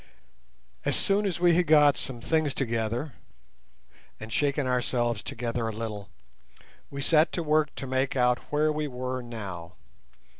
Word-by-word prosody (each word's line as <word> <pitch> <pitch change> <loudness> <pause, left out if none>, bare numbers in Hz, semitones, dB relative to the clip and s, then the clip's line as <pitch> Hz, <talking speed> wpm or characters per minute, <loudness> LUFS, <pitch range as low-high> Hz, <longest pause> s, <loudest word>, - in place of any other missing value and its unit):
As - - 0
soon 200 +1 +2
as 175 -4 -3
we 175 -1 +5
had 175 +1 +2
got 150 -2 +6
some 120 0 -4
things 155 +1 0
together 115 +2 -2 1.1
and 110 0 -7
shaken 145 -1 +1
ourselves 120 -3 0
together 115 0 -3
a - - -2
little, 105 -3 -6 0.8
we 140 0 -5
set 155 +1 +4
to 170 - -2
work 155 -1 +1
to - - -5
make 130 +1 0
out 125 -1 +3
where 150 +1 +2
we 150 0 -2
were 130 -1 -4
now. 95 -8 -7
130 Hz, 150 wpm, -27 LUFS, 115-150 Hz, 1.1 s, got